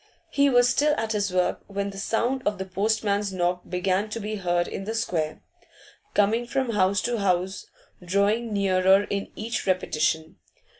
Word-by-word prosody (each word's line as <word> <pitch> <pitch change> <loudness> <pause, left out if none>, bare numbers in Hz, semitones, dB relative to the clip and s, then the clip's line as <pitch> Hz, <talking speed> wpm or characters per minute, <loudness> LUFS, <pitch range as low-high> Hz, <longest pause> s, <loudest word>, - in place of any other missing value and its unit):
He 280 0 +3
was 245 -1 +5
still 295 +4 +3
at 220 -1 -2
his 205 -3 0
work 180 0 0
when 200 0 -3
the 195 - -8
sound 240 +6 0
of 205 0 0
the 190 - -4
postman's 205 +1 0
knock 180 -1 0
began 185 +3 0
to 230 - -4
be 215 0 -4
heard 175 -2 0
in 195 - -5
the 220 +2 -3
square, 165 -9 -2 0.7
coming 220 +4 +2
from 265 -1 -1
house 195 -1 +2
to 240 -1 -1
house, 190 0 0 0.4
drawing 200 +5 +1
nearer 195 -1 +4
at - - -9 0.2
each 225 0 -4
repetition. 160 -3 0
200 Hz, 165 wpm, -25 LUFS, 185-225 Hz, 0.7 s, was